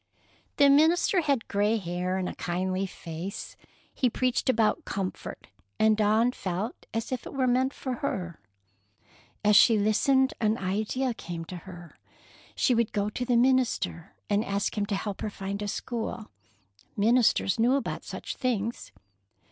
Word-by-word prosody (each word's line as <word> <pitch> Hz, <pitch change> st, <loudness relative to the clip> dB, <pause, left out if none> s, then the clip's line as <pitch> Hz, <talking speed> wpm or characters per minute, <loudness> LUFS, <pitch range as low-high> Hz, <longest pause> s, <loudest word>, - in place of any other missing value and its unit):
The 285 Hz, -, +6 dB
minister 325 Hz, +6 st, +4 dB
had 280 Hz, -7 st, 0 dB
gray 205 Hz, +3 st, +1 dB
hair 180 Hz, -1 st, -2 dB
and 185 Hz, -1 st, -2 dB
a -, -, -4 dB
kindly 185 Hz, +2 st, -2 dB
face. 170 Hz, +2 st, -7 dB, 0.4 s
He 255 Hz, -, +1 dB
preached 255 Hz, +2 st, 0 dB
about 230 Hz, +6 st, +2 dB
comfort, 195 Hz, -6 st, -5 dB, 0.3 s
and 220 Hz, 0 st, +4 dB
Dawn 220 Hz, +3 st, +3 dB
felt 195 Hz, 0 st, -4 dB
as 225 Hz, +2 st, -3 dB
if 255 Hz, -2 st, -3 dB
it -, -, -9 dB
were 265 Hz, -1 st, +1 dB
meant 255 Hz, +2 st, +2 dB
for 260 Hz, -2 st, -4 dB
her. 180 Hz, -, -3 dB, 1.1 s
As 210 Hz, 0 st, +5 dB
she 225 Hz, +1 st, +7 dB
listened, 260 Hz, +6 st, +3 dB
an 215 Hz, 0 st, +2 dB
idea 215 Hz, +7 st, -1 dB
came 170 Hz, -6 st, -7 dB
to 180 Hz, -, -8 dB
her. 175 Hz, -1 st, -11 dB, 0.6 s
She 255 Hz, -, +2 dB
would 235 Hz, -2 st, +1 dB
go 205 Hz, 0 st, 0 dB
to 250 Hz, -, -3 dB
the 245 Hz, -1 st, +2 dB
minister 235 Hz, -, +1 dB
and 205 Hz, +1 st, +1 dB
ask 200 Hz, -1 st, -2 dB
him 205 Hz, -1 st, -1 dB
to 200 Hz, -, -1 dB
help 200 Hz, 0 st, -4 dB
her -, -, -2 dB
find 200 Hz, 0 st, -5 dB
a 205 Hz, -, -2 dB
school. 225 Hz, 0 st, -4 dB, 0.7 s
Ministers 220 Hz, -2 st, +3 dB
knew 245 Hz, +4 st, +4 dB
about 275 Hz, -, -3 dB
such -, -, -6 dB
things. 230 Hz, -, -2 dB
215 Hz, 155 wpm, -27 LUFS, 195-250 Hz, 1.1 s, she